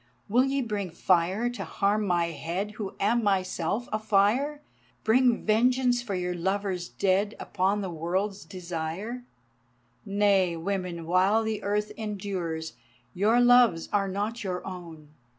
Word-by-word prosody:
Will 245 +5 +3
ye 270 0 0
bring 205 -4 -3
fire 185 +6 +1
to 245 - -5
harm 205 +1 0
my 175 -2 +2
head 170 +7 -3
Who 210 -2 -6
am 230 +4 +2
myself 195 +2 0
a 215 - +1
fire, 220 +8 +1 0.4
Bring 245 +1 +3
vengeance 245 +3 +3
for 215 -5 -4
your 180 0 -2
Lovers 190 0 -2
dead 200 +2 +1
Upon 200 +2 0
the 190 - -3
World's 185 +5 -2
Desire? 180 +6 -5 0.8
Nay, 200 -4 +2
women 180 -1 -3
while 190 +6 +3
the 220 -1 -2
earth 210 +1 -1
endures, 190 -7 -4 0.4
Your 215 +6 +3
loves 245 -8 +5
are 200 -1 +2
not 205 +5 -3
your 180 -2 -4
own. 170 -5 -9
200 Hz, 135 wpm, -27 LUFS, 180-220 Hz, 0.8 s, loves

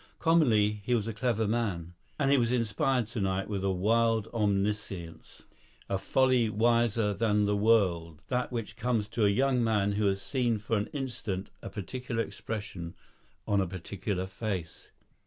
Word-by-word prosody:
Commonly 110 -11 +3
he 125 +4 +1
was 110 -2 -1
a 115 - -3
clever 115 -1 0
man, 100 -7 -2 0.2
and 140 -2 +2
he 140 - +6
was 120 -1 +1
inspired 120 +1 +1
tonight 95 -3 -2
with 100 -2 -3
a 95 - +1
wild 110 +3 +2
omniscience, 100 -5 -2 0.4
a 95 - -1
folly 130 -1 +3
wiser 115 -1 +2
than 105 -1 +2
the 105 0 +1
world, 95 -7 +2
that 125 0 -1
which 115 -3 -4
comes 115 -3 0
to 110 -1 +1
a - - +5
young 125 +3 +2
man 105 -3 +2
who 105 0 +1
has 95 0 +1
seen 120 +2 0
for 110 +2 -2
an 105 0 0
instant 120 -8 -4
a - - -6
particular 115 +2 -3
expression 100 -8 -6 0.5
on 100 -1 +3
a 95 - -1
particular 95 +2 -4
face. 95 -3 -5
105 Hz, 160 wpm, -29 LUFS, 100-115 Hz, 0.5 s, he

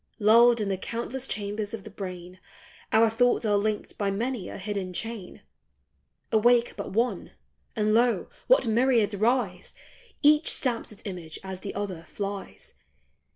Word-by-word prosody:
Lulled 235 +2 +6
in 205 -2 -1
the 190 -1 -1
countless 240 +5 -4
chambers 205 +1 -3
of 210 - -11
the 215 - -10
brain, 185 -2 -8 0.5
Our 225 +1 +5
thoughts 240 +1 +2
are 210 -1 +3
linked 210 +1 -2
by 200 -1 +1
many 220 0 -2
a - - -7
hidden 195 -2 -4
chain. 220 -1 -6 0.9
Awake 235 +2 +4
but 200 - -5
one, 235 +5 -1 0.4
and 215 -1 +1
lo, 235 +1 +3 0.2
what - - +5
myriads 230 -1 +3
rise! 215 -3 0 0.5
Each 300 +2 +5
stamps 240 -4 0
its 210 - -14
image 175 -5 -6
as 190 -1 -6
the 195 - -7
other 195 -4 -4
flies 205 - -6
215 Hz, 150 wpm, -27 LUFS, 195-235 Hz, 0.9 s, Lulled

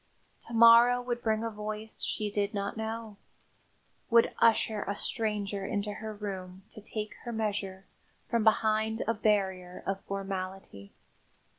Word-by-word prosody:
To 235 - -9
morrow 235 +2 +8
would 245 -1 -3
bring 220 0 0
a 230 - -2
voice 215 +1 -5
she 210 -1 -1
did 205 0 -1
not 200 0 -2
know; 220 -1 -5 0.9
would 230 -1 +5
usher 220 -2 +3
a 200 - -3
stranger 205 -3 -1
into 205 +1 -2
her 220 +1 -6
room 190 -3 -6
to 215 - -10
take 215 0 -4
her 240 - -5
measure 200 -4 -3 0.4
from 235 -2 +1
behind 220 0 +2
a 230 - +3
barrier 190 -4 0
of 195 0 -2
formality. 190 - -5
210 Hz, 140 wpm, -30 LUFS, 195-220 Hz, 0.9 s, morrow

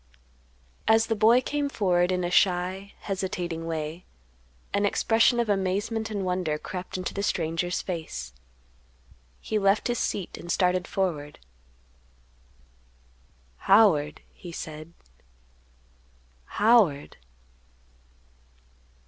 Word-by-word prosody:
As 225 +1 +5
the 225 - -1
boy 225 +4 +5
came 285 +2 -2
forward 180 -7 +1
in 180 -1 0
a 175 - -2
shy, 185 +1 +1
hesitating 180 -4 -3
way, 160 +1 -4 0.7
an 200 - +1
expression 225 +4 +3
of 235 - +1
amazement 205 +3 -1
and 200 -3 -3
wonder 180 -4 -1
crept 180 +4 -6
into 185 - -4
the 200 - -3
stranger's 170 -2 -1
face; 155 - -5 1.1
he 215 - -1
left 195 +4 +2
his 240 - 0
seat 195 -4 -3
and 175 - -5
started 180 0 +1
forward. 155 -7 -2 2.2
"Howard," 170 - +4
he 175 - -10
said; 155 0 -8 1.5
"Howard." 205 - +2
185 Hz, 100 wpm, -26 LUFS, 170-210 Hz, 2.2 s, As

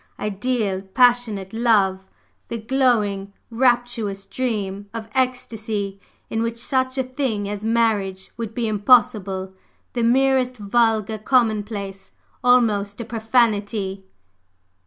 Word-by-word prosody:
ideal, 210 -1 -1
passionate 220 -2 +2
love! 200 -5 +2 0.4
the 235 - -4
glowing, 220 -5 +1 0.2
rapturous 240 -5 +1
dream 205 -5 -3
of 225 -1 -5
ecstasy 220 -6 -2 0.3
in 225 - -2
which 230 0 -2
such 260 +2 -1
a 265 - +2
thing 255 -6 -2
as 205 0 -5
marriage 215 -4 0
would 225 -1 -6
be 235 -2 -1
impossible, 205 -3 +2 0.4
the 240 - -1
merest 255 +1 +2
vulgar 220 0 +1
commonplace 210 -5 -1 0.3
almost 215 -5 +3
a 235 - -4
profanity." 215 -4 0
220 Hz, 105 wpm, -22 LUFS, 200-245 Hz, 0.4 s, almost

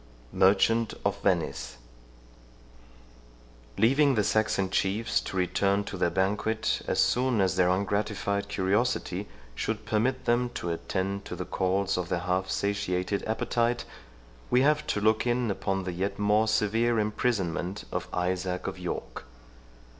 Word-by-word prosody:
MERCHANT 105 +4 +3
OF 100 0 0
VENICE 75 -11 -1 2.0
Leaving 135 +5 +4
the 105 - +2
Saxon 100 -3 +1
chiefs 100 +4 +1
to 95 - -5
return 100 +2 +1
to 100 - -6
their 90 - +1
banquet 105 +4 0
as - - 0
soon 125 -2 +2
as 95 -1 +2
their 90 -1 +3
ungratified 100 +1 -1
curiosity 100 -1 0 0.3
should - - -3
permit 130 +4 0
them 120 +1 +2
to 85 - -3
attend 95 +3 -2
to - - -6
the - - -5
calls 95 0 0
of 90 -1 -4
their 90 -2 -1
half 90 +1 -1
satiated 100 -1 -1
appetite, 120 +2 0 0.6
we 125 +1 +4
have 150 +1 +2
to - - 0
look 110 +3 +2
in 120 -2 +1
upon 95 0 -2
the 90 -1 -4
yet 95 +3 -2
more 105 +2 +3
severe 110 +2 +2
imprisonment 105 -4 -1
of 90 0 -3
Isaac 90 0 -2
of 95 -1 -4
York. 90 -1 -5
100 Hz, 140 wpm, -28 LUFS, 95-110 Hz, 2.0 s, Leaving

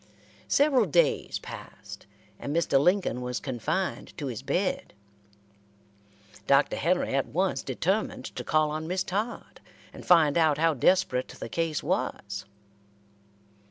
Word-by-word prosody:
Several 285 -2 +4
days - - +2
passed, - - -10 0.3
and 145 - -4
Mr. 165 -5 +3
Lincoln 180 - +2
was 125 0 -3
confined 155 - -3
to 150 - -4
his 125 -3 -4
bed. 175 - -2 1.5
Dr. 140 +1 +4
Henry 180 -1 +1
at 135 0 +1
once 185 +4 0
determined 190 - -1
to - - -4
call 155 -1 +2
on 155 +1 -4
Miss 185 +2 -1
Todd, 210 +6 -4 0.3
and - - -10
find 165 -3 +5
out 155 -3 +3
how 165 +1 +3
desperate 130 -3 +2
the - - -8
case 165 0 -1
was. 100 0 -2
160 Hz, 125 wpm, -27 LUFS, 135-185 Hz, 1.5 s, find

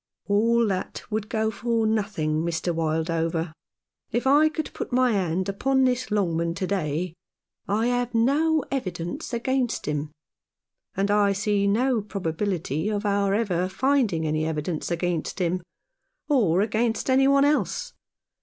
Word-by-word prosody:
" - - -46
All 230 +3 +3
that 190 -3 -3
would 215 0 -2
go 220 -1 0
for 230 +1 0
nothing, 200 -8 0
Mr. 170 +1 -1
Wildover. 165 0 -1 0.6
If 240 - -1
I 295 +3 +5
could 315 0 -5
put - - -5
my 255 0 +3
hand 185 -3 0
upon 265 +7 +1
this 250 0 +1
Longman 170 -5 0
to 185 - -2
day 175 -3 -2 0.5
I 215 +3 +1
have 245 -1 0
no 295 +7 +3
evidence 175 -10 -4
against 250 0 -1
him; 150 0 -2 0.9
and 200 +1 +1
I 205 -1 +3
see 200 0 +1
no 235 +3 +2
probability 180 -3 -2
of 210 0 -2
our 200 -1 +2
ever 185 -5 0
finding 225 - +1
any 155 0 0
evidence 155 +1 -2
against 170 -1 -2
him, 180 -1 0 0.7
or 205 - +3
against 220 +2 0
any 265 +1 +4
one 275 0 +5
else. - - 0
205 Hz, 145 wpm, -25 LUFS, 170-240 Hz, 0.9 s, I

